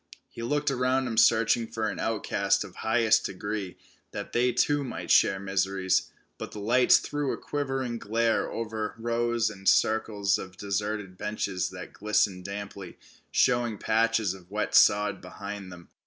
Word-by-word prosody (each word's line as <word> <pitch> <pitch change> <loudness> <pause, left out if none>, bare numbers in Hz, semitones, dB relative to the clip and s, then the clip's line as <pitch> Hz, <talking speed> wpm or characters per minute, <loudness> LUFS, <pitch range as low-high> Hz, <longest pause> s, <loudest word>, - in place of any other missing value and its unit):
He - - -9
looked 145 +4 0
about 130 0 +1
him 120 -3 -3
searching 115 +1 +4
for 110 -1 -2
an 100 - -4
outcast 110 -1 0
of - - -12
highest 115 0 +3
degree 100 -1 -4 0.4
that - - -6
they 125 +1 +3
too 145 +4 +1
might 130 - -5
share 95 - +5
miseries, 95 -1 0 0.3
but - - -6
the 105 - -7
lights 120 +5 +5
threw 145 -2 -2
a - - -3
quivering 135 -4 -3
glare 115 +2 0
over 110 -2 -4
rows 115 -1 0
and 95 -2 0
circles 105 -3 +2
of 95 0 -9
deserted 100 -1 -3
benches 95 -3 -2
that 95 -1 -9
glistened 100 -3 0
damply, 100 -2 -7 0.3
showing 120 -3 +2
patches 110 -2 +1
of 90 -2 -14
wet 105 +1 -2
sod 105 -1 +4
behind 100 +1 -8
them. 85 -1 -12
110 Hz, 155 wpm, -27 LUFS, 100-115 Hz, 0.4 s, share